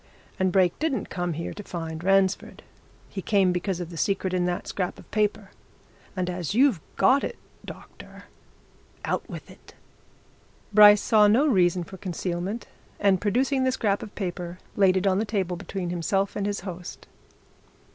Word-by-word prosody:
And 185 -1 +2
Brake 180 -2 +3
didn't 305 -4 -2
come 175 -2 -2
here 165 +2 -5
to 205 - -8
find 165 -4 -6
Ransford. 195 0 +1 0.4
He 195 - -6
came 195 -2 +3
because 180 +1 -2
of 175 -1 -6
the 165 - -8
secret 190 +2 0
in 180 -1 +1
that 175 0 -2
scrap 185 -2 -3
of - - -16
paper. 210 -1 -1 0.6
And 185 -2 -1
as 180 +1 -3
you've 250 - +4
got 275 +2 +4
it, - - -4 0.3
doctor - - -12 0.8
out - - -2
with - - -9
it!" - - -17 1.0
Bryce 210 0 +8
saw 215 -2 +5
no 235 +8 +4
reason 180 - +3
for 190 +3 -11
concealment 180 +4 -4 0.3
and 195 -3 +3
producing 260 +6 +1
the 260 - +2
scrap 205 -5 0
of 210 - -9
paper 180 -2 -4 0.2
laid 190 -2 +4
it 190 - -1
on 190 0 +3
the - - +1
table 195 -5 -2
between 180 0 -5
himself 195 +3 -1
and 200 -1 -1
his 205 -2 -2
host. 180 -1 -8
190 Hz, 165 wpm, -25 LUFS, 180-205 Hz, 1.0 s, Bryce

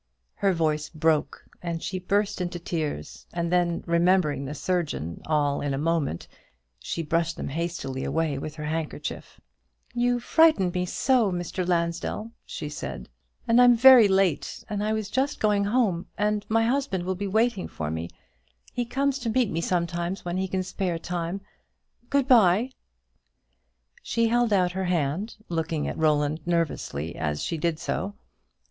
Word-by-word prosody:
Her 195 - +2
voice 155 -3 0
broke, 155 -1 0 0.2
and 170 -1 -4
she 185 +1 -3
burst 200 +2 0
into 175 0 -3
tears; 155 - -4
and 170 -1 -1
then, 175 -1 +1
remembering 170 -5 +2
the 145 +3 -5
surgeon 150 - -2
all 145 -2 +1
in 140 -1 -1
a - - -3
moment, 155 - -1 0.5
she 165 - -3
brushed 165 +2 0
them - - -4
hastily 150 -4 -3
away 150 -1 0
with 150 +2 -6
her 150 -1 -6
handkerchief. 155 -1 -4 0.5
"You 245 0 +1
frightened 275 - +4
me 180 -1 -1
so, 245 -1 +2
Mr. 175 0 -3
Lansdell," 175 +5 -1 0.2
she 150 - -5
said: - - -6 0.4
"and 230 +2 +5
I'm 245 -1 +7
very 245 -2 +9
late, 190 -6 +1
and 205 -2 -2
I 215 - 0
was 220 -2 -1
just 265 +7 -1
going 205 -2 +2
home, 205 -5 +1
and 210 0 0
my 225 +1 +3
husband 245 -7 0
will 185 +1 -1
be 200 +2 -4
waiting 220 0 +1
for 75 -1 -4
me. 80 +1 -4 0.6
He 245 - -1
comes 275 +3 0
to 240 -3 -2
meet 240 -2 +2
me 165 - -1
sometimes 175 +2 -1
when 175 +1 -2
he 190 0 0
can 185 0 -1
spare 185 -2 -2
time. 175 +2 -3 0.7
Good 280 -2 +2
bye." 225 -1 +5 1.3
She 230 -1 +1
held 240 -1 +2
out 180 -3 +3
her 190 +1 -2
hand, 175 +4 -1
looking 160 -2 -2
at - - -3
Roland 150 -1 +2
nervously 150 - -1
as 75 -2 -2
she - - -2
did 165 0 0
so. 200 +4 -3
175 Hz, 160 wpm, -26 LUFS, 160-210 Hz, 1.3 s, very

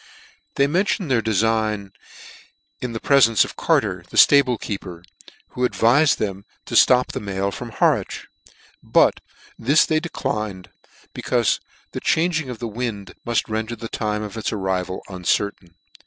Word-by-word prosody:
They 140 - +3
mentioned 180 - 0
their 120 -3 +3
defign 110 -2 0 0.9
in 125 - -3
the 110 - -4
prefence 115 -6 +4
of - - -10
Carter, 90 -5 0
the - - -7
ftable 130 -5 +5
keeper, 90 -4 -6 0.5
who 125 - -8
advifed 125 +4 +3
them 100 -2 -3 0.2
to - - -5
flop 125 0 +5
the - - -4
mail 100 -1 -2
from 120 +3 -7
Harwich; 110 - 0 0.6
but - - +3 0.4
this 140 +7 +4
they 155 -1 +1
de 175 - -6
clined, 105 - -4 0.4
becaufe - - 0 0.3
the - - -5
changing 160 -3 +1
of 125 - -6
the 120 +1 -5
wind 110 -4 -5
mull 120 - -3
render 110 +1 -3
the 115 0 -7
time 105 0 -2
of 105 +1 -7
its 110 - -2
arrival 95 -3 -3
uncertain. 90 -1 -2
110 Hz, 150 wpm, -22 LUFS, 100-125 Hz, 0.9 s, ftable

